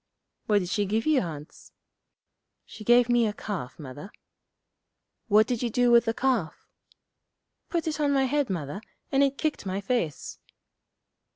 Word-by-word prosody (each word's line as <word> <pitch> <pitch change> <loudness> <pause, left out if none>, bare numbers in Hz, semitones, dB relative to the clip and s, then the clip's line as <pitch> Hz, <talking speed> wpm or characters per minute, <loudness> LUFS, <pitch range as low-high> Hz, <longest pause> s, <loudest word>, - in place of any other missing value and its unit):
'What 210 -2 +4
did 180 - -5
she 205 +1 0
give 220 +3 0
you, 310 -4 +3
Hans?' 150 -4 -9 0.9
'She 215 - -11
gave 240 +2 +5
me 240 -2 +3
a 210 - -2
calf, 195 -12 -6
Mother.' 145 +6 -9 1.2
'What 215 0 +5
did 240 0 -2
you 240 - 0
do 245 +2 +2
with 235 -1 +6
the 225 - 0
calf?' 250 -11 -1 1.0
'Put 335 -2 -2
it 310 -1 -2
on 290 -1 +2
my 270 -1 +3
head, 280 0 0
Mother, 170 +1 -4 0.3
and 270 - +3
it 275 0 +2
kicked 310 -2 -2
my 190 0 -3
face.' 195 - -3
225 Hz, 160 wpm, -27 LUFS, 195-265 Hz, 1.2 s, with